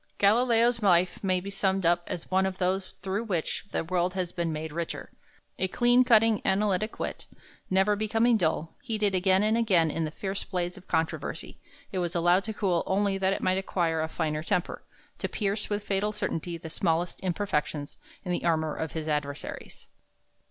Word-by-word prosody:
Galileo's 230 +2 +3
life 180 -2 +3
may 185 -1 +2
be 195 +2 -7
summed 195 -1 0
up 175 +1 +3
as 170 - -6
one 190 +1 +3
of 190 -1 -4
those 185 +1 -1
through 195 +3 -1
which 185 -6 -2
the - - -1
world 180 +2 0
has 180 -2 -2
been 170 -2 -2
made 155 0 -4
richer. 170 +1 -5 0.5
A 190 - +1
clean 245 +5 +4
cutting 225 -3 +4
analytic 200 +2 +1
wit, - - -4 0.4
never 190 +2 +3
becoming 225 +3 +2
dull: 165 -4 0
heated 215 -6 0
again 190 +1 +3
and 215 +1 +3
again 185 -9 +3
in 165 - -2
the 155 - -1
fierce 195 +5 -4
blaze 180 -2 -3
of 190 - -14
controversy, 160 -1 -2 0.3
it 190 - -2
was 175 0 -2
allowed 175 +3 +4
to 220 - -3
cool 190 -5 +1
only 195 0 +1
that 190 0 +2
it - - -4
might 185 +1 +2
acquire 170 -4 0
a 160 - -1
finer 155 -2 -2
temper, 175 +2 -1 0.4
to - - -2
pierce 205 0 -1
with 205 0 -1
fatal 205 +1 0
certainty 175 -5 -3
the 160 -1 -8
smallest 170 0 0
imperfections 165 -6 -2 0.3
in 180 - -2
the 175 - -1
armor 160 -2 +1
of 160 - -4
his 160 -1 -4
adversaries. 150 -1 -4
185 Hz, 185 wpm, -28 LUFS, 170-205 Hz, 0.5 s, clean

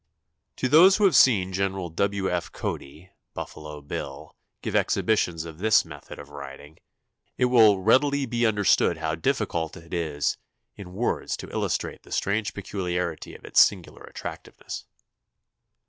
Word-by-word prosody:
To 130 - -1
those 170 +8 +7
who 210 - 0
have 185 -7 +4
seen 95 -7 +5
Gen. 95 +1 0 0.2
W. 100 +1 0
F. 85 -2 -2
Cody 80 +6 -6 0.2
("Buffalo 75 -1 -8
Bill") 70 +1 -7 0.3
give - - -3
exhibitions 90 -7 +1
of 80 -1 -10
this 110 +1 +4
method 75 -3 -11
of 70 0 -11
riding, 70 +2 -10 0.6
it 125 - +3
will 115 -5 +6
readily 140 +5 +3
be 120 -1 -1
understood 105 -5 +2
how 80 0 -2
difficult 80 0 -1
it 85 +1 -13
is 80 -4 -1 0.4
in 95 -3 -10
words 115 +6 -2
to - - -9
illustrate - - -2
the - - -18
strange 105 +2 -1
peculiarity 90 -4 -4
of - - -13
its - - +5
singular - - +1
attractiveness. - - -8
90 Hz, 145 wpm, -25 LUFS, 80-110 Hz, 0.6 s, those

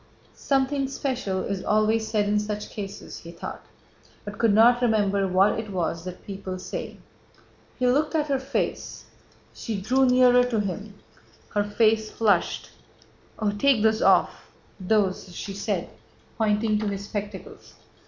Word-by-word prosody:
"Something 275 0 0
special 255 -8 -2
is 195 -2 -3
always 215 +1 +2
said 210 -2 0
in 210 0 +2
such 210 0 -4
cases," 200 -1 -7
he 165 - -11
thought, 170 - -8 0.6
but 205 0 -8
could 230 -2 +4
not 235 +4 +5
remember 200 -4 +2
what 190 +4 +3
it 220 -1 -6
was 170 -3 -2
that 180 0 -8
people 195 -2 -6
say. - - -6 0.8
He 250 - 0
looked 295 +6 +2
at 305 -2 +2
her 275 -3 0
face. 265 +1 -3 0.5
She 220 -3 -4
drew 260 +7 +2
nearer 250 0 +5
to 235 -3 -1
him. 205 +1 -4 0.6
Her 205 - +2
face 215 +1 +2
flushed. 205 -6 0 0.7
"Oh, 215 -2 0
take 220 +2 +2
those 220 0 +3
off... - - +2 0.3
those..." 190 -2 0
she 200 - -5
said, 200 - -2 0.5
pointing 215 -1 +1
to 215 - -2
his 200 0 -4
spectacles. 205 -1 -7
210 Hz, 145 wpm, -25 LUFS, 200-240 Hz, 0.8 s, not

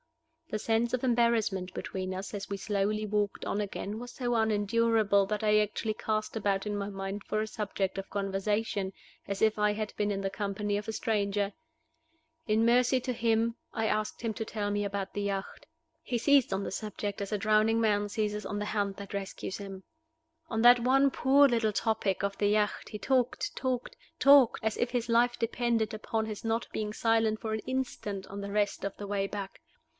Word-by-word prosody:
The 215 - -1
sense 230 +2 +1
of 255 - 0
embarrassment 230 -6 +1
between 185 0 -4
us 190 +3 -6
as 200 -1 -5
we 200 - -2
slowly 210 +1 -1
walked 205 -1 -1
on 210 - -1
again 205 +1 -4
was 245 0 -7
so 245 -2 -2
unendurable 220 -1 +3
that 210 +1 -2
I 210 0 +5
actually 215 +1 -1
cast 215 +1 -2
about 200 -2 0
in 210 0 -2
my 200 0 -3
mind 195 +1 -5
for 215 - -1
a 215 - -1
subject 200 -3 -2
of 195 - -7
conversation, 200 0 -1 0.4
as 200 0 -3
if 220 -1 +3
I 210 0 +3
had 215 0 -4
been 210 0 0
in 195 - -1
the 195 0 -1
company 205 +1 -2
of 210 +2 -3
a - - 0
stranger! 205 -3 0 0.9
In 220 +1 +3
mercy 250 +2 +4
to 250 0 -3
him, 230 0 +1 0.2
I 220 - -1
asked 215 +1 -1
him 225 -1 -1
to 220 - -3
tell 210 -2 -3
me 205 0 0
about 200 -1 -3
the 205 - -2
yacht. 200 +8 -4 0.3
He 245 - -2
seized 275 0 +4
on 195 +1 -1
the - - -4
subject 205 0 -4
as 200 - -4
a 210 - +1
drowning 215 +2 +3
man 205 -2 +2
seizes 210 -1 -2
on 205 - -3
the 210 - -2
hand 205 -2 -1
that 200 0 -8
rescues 195 -1 -4
him. 195 -2 -8 0.7
On 225 -1 0
that 245 0 +8
one 270 +3 +4
poor 280 +2 +5
little 230 -4 +1
topic 210 -3 0
of 200 0 -1
the 205 - +3
yacht 210 0 0
he 210 - -6
talked, 255 +1 0
talked, 255 - -2 0.2
talked, 275 -4 +6
as 220 - +1
if 240 - 0
his 245 -2 -1
life 240 +1 +3
depended 230 -1 0
upon 220 +1 -2
his 215 -2 -6
not 225 +1 -1
being 210 -1 -2
silent 225 0 +2
for 220 -1 -3
an 220 - -1
instant 240 -7 -3
on 200 +1 -6
the 200 0 -5
rest 205 -2 0
of 200 0 -4
the 205 - -6
way 200 -1 0
back. 200 -1 -6
215 Hz, 200 wpm, -30 LUFS, 200-230 Hz, 0.9 s, that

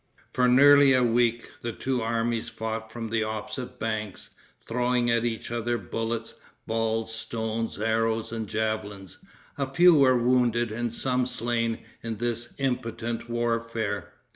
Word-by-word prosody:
For 125 -1 +3
nearly 140 +2 +7
a 130 - +4
week 120 0 +1
the 120 - -3
two 130 +1 -2
armies 115 0 -1
fought 110 0 -5
from 115 -1 -6
the 115 -1 +1
opposite 125 +4 -5
banks, 110 -3 -4 0.4
throwing 120 0 +1
at 115 0 +2
each 115 -1 -3
other 120 0 -1
bullets, 115 +3 -3 0.3
balls, 115 0 -1
stones, 115 -1 -3
arrows 115 0 0
and 110 -2 -4
javelins. 105 -3 -3 0.4
A 135 -1 -1
few 175 +5 +7
were 135 -4 +5
wounded 120 -1 +2
and 120 +1 -2
some 125 +1 0
slain 115 -2 -1 0.2
in 115 -1 -4
this 120 +1 -3
impotent 120 -3 -2
warfare. 115 -3 -2
115 Hz, 140 wpm, -27 LUFS, 110-120 Hz, 0.4 s, nearly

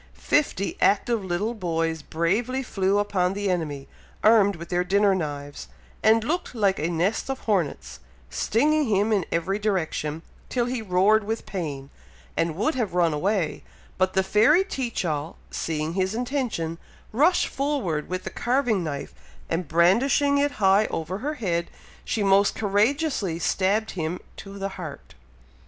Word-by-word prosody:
Fifty 285 -10 0
active 210 +2 +2
little 190 +5 -1
boys 165 -5 -2
bravely 220 - -1
flew 195 -4 0
upon 190 -3 +1
the 200 -1 -1
enemy, 150 -6 -3 0.4
armed 210 -3 +5
with 170 0 -9
their 180 0 +1
dinner 200 +2 +3
knives, 145 - -4 0.3
and 220 +1 +4
looked 325 +1 -2
like 200 -4 +2
a 155 +3 0
nest 175 +9 0
of 270 0 -3
hornets, 185 -9 -1 0.3
stinging 300 - +1
him 210 +1 +2
in 195 -5 0
every 190 +5 0
direction, 165 -6 -2 0.3
till 245 -2 0
he 245 -1 -2
roared 205 +2 +3
with 225 +2 -3
pain, 145 -7 -5 0.4
and 165 -2 0
would 220 - +1
have 225 - -2
run 170 -3 +3
away, 180 +1 -1 0.4
but 185 0 +2
the 190 - +2
fairy 225 - +4
Teach 255 - -3
all, 150 -1 -3
seeing 155 0 -2
his 190 +2 0
intention, 240 - -2 0.3
rushed 305 +11 +3
forward 265 - -2
with 185 0 -3
the - - -5
carving 240 -6 +1
knife, 145 -3 -5 0.4
and 165 0 -1
brandishing 240 - +3
it 285 0 +1
high 200 -2 +3
over 175 +4 -4
her 295 +5 -3
head, 170 -8 -1 0.3
she 215 - -1
most 200 +1 +4
courageously 215 - +1
stabbed 195 +5 +1
him 170 0 -3 0.2
to 195 0 -9
the 195 0 -3
heart! 175 -7 -9
195 Hz, 150 wpm, -25 LUFS, 170-225 Hz, 0.4 s, armed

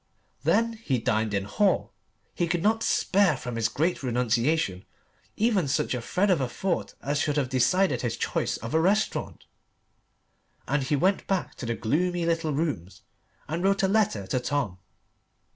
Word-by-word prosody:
Then 230 +1 +2
he 135 - 0
dined 110 -2 0
in 100 -1 0
Hall 185 - +1 0.4
he 175 - 0
could 170 0 -1
not 220 +2 +2
spare 195 -8 +2
from 125 -1 -6
his 115 -2 +1
great 165 +9 0
renunciation 120 - 0 0.5
even 210 -7 +2
such 135 - 0
a 125 - -2
thread 190 - +1
of 170 -6 +2
a 130 - -1
thought 180 +8 -2
as 145 +1 0
should 150 0 0
have 135 -3 0
decided 135 +2 +2
his 120 -2 -2
choice - - -1
of 115 - -7
a 160 - +4
restaurant; 205 +5 0 1.2
and 145 +1 +1
he 135 +3 0
went 190 +7 +1
back 190 -2 -1
to 120 - -7
the 115 - -1
gloomy 170 - 0
little 165 -1 0
rooms 140 - -3 0.4
and 165 +4 -3
wrote 195 0 +2
a - - +4
letter 195 - +1
to 95 +7 -1
Tom. 125 -7 -2
145 Hz, 170 wpm, -27 LUFS, 120-185 Hz, 1.2 s, a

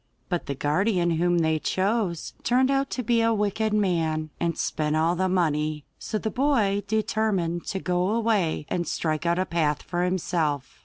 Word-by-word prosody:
But 175 -2 -2
the 140 - -2
guardian 175 +5 +1
whom 175 +2 +2
they 160 -1 +2
chose 190 -1 -1
turned 260 +2 +2
out 275 0 +1
to 250 - -3
be 235 +1 +2
a 230 0 +3
wicked 210 +1 0
man, 165 -7 0
and 170 -1 -1
spent 150 0 -1
all 165 +2 +2
the 185 +1 0
money, 155 -4 0
so 215 - -3
the 220 0 -3
boy 235 -8 +2
determined 210 -5 0
to 195 - -2
go 180 0 0
away 215 -9 +1
and 175 -1 -2
strike 155 +1 -1
out 170 +1 +2
a 185 - +1
path 155 -5 0
for 175 0 -2
himself. 165 -6 -1
180 Hz, 175 wpm, -25 LUFS, 160-215 Hz, -, a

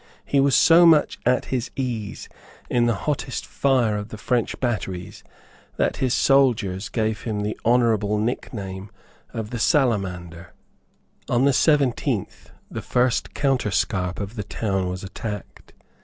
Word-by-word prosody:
He 140 - +1
was 135 0 +4
so 170 +1 +7
much 160 -3 +4
at 125 0 +2
his 125 -2 -1
ease 120 -6 -4 0.4
in 120 -1 +3
the 115 - +2
hottest 145 -3 -2
fire 130 -6 +1
of 105 +1 -6
the 110 - -8
French 120 +1 -1
batteries 95 -8 -3 0.5
that - - 0
his 130 -2 0
soldiers 110 -9 +2
gave 110 -1 -1
him 105 -3 -3
the 105 +1 -2
honourable 110 -3 +2
nickname 100 -3 -4 0.4
of 110 -1 -5
the 120 - -4
Salamander. 95 - 0 0.8
On 120 +2 +3
the 140 - +4
seventeenth 140 -4 +1 0.2
the - - -4
first 125 0 0
counterscarp 100 -9 0
of 100 +1 -5
the 105 - -2
town 95 -3 -2
was 90 +1 -5
attacked. 105 +1 -7
115 Hz, 140 wpm, -23 LUFS, 100-130 Hz, 0.8 s, so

